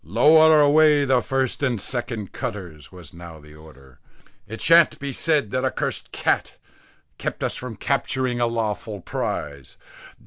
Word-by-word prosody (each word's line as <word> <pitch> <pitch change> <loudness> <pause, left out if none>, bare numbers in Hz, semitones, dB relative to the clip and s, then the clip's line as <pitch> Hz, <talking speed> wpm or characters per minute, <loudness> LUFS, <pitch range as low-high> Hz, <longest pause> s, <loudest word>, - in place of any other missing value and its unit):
"Lower 160 0 +5
away 150 0 +4
the 130 -2 +2
first 135 +1 -2
and 125 -6 0
second 120 -3 -5
cutters," 85 -7 -7
was 90 -5 -14
now 85 -2 -11
the 75 0 -16
order. 70 -5 -17 0.5
"It 115 +1 -8
shan't 165 0 +4
be 140 -1 -6
said, 150 -10 0
that 130 - -1
a - - +2
cursed - - -4
cat - - -1 0.6
kept - - -4
us - - -2
from 125 -3 -7
capturing 130 0 -2
a 120 - +2
lawful 110 -2 -3
prize. 70 -5 -5
120 Hz, 150 wpm, -22 LUFS, 85-140 Hz, 0.6 s, Lower